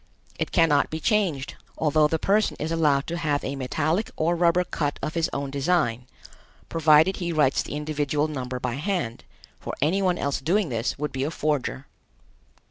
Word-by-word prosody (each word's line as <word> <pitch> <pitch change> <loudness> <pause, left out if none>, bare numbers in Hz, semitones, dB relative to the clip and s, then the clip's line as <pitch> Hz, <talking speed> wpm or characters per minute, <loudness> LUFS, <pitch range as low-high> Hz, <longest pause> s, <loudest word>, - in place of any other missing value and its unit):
It - - -2
cannot 150 -4 +3
be 160 - -4
changed, 165 -7 0 0.2
although 155 -1 +3
the 160 - 0
person 205 +6 +1
is 155 +2 -3
allowed 150 -4 +2
to 170 +1 -4
have 150 -3 0
a 140 - -3
metallic 155 - -1
or 170 +2 +1
rubber 175 +1 +3
cut 145 -4 -2
of 155 - -2
his 165 -1 0
own 140 -1 -3
design, 140 -5 0 0.6
provided 160 +3 +4
he 175 -2 -2
writes 150 -4 +2
the - - -6
individual 150 0 -1
number 130 -4 -4
by 125 0 -3
hand, 150 - -3 0.3
for - - -6
any 170 +8 +1
one 180 -2 +1
else 140 0 -2
doing 180 +4 +1
this 115 -1 -2
would 150 0 -3
be 135 0 -2
a 145 - -1
forger. 145 -4 -2
150 Hz, 180 wpm, -25 LUFS, 140-170 Hz, 0.6 s, provided